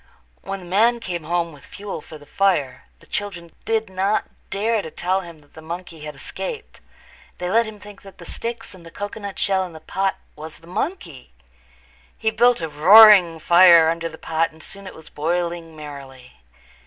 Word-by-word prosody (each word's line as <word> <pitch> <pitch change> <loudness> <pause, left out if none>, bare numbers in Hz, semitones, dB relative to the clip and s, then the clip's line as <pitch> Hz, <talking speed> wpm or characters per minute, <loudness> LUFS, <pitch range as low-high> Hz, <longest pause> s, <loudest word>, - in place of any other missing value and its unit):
When 195 -1 -6
the - - -11
man 225 +7 +3
came 175 -7 -5
home 170 0 -1
with 145 -2 -16
fuel 200 -5 -7
for 155 - -12
the 145 - -16
fire 145 -8 0 0.2
the - - -17
children 180 -5 -5
did 220 -1 0
not 190 +3 0 0.2
dare 215 +3 0
to 160 - -8
tell 185 +4 -1
him 170 -3 -11
that 145 - -26
the 160 - -12
monkey 170 0 -7
had 150 -1 -7
escaped. 450 - -7 0.6
They 180 0 -3
let 230 +2 +3
him 215 -1 -10
think 205 -1 -13
that 195 -1 -14
the 170 - -12
sticks 230 +4 -5
and 185 -2 -14
the 165 - -11
cocoanut 205 +2 -7
shell 190 -1 +1
in 180 -2 -8
the 160 - -10
pot 190 +4 -1 0.2
was 155 +1 -9
the 165 - -19
monkey. 175 - -5 0.8
He 220 0 0
built 240 -1 +3
a 165 - -2
big 150 -1 -15
roaring 190 -1 +8
fire 170 0 +6
under 165 0 -3
the 160 - -12
pot 165 +1 -1
and 160 0 -15
soon 200 0 -8
it - - -10
was 160 - -13
boiling 170 +1 -3
merrily. 140 -4 -11
175 Hz, 195 wpm, -22 LUFS, 160-205 Hz, 0.8 s, roaring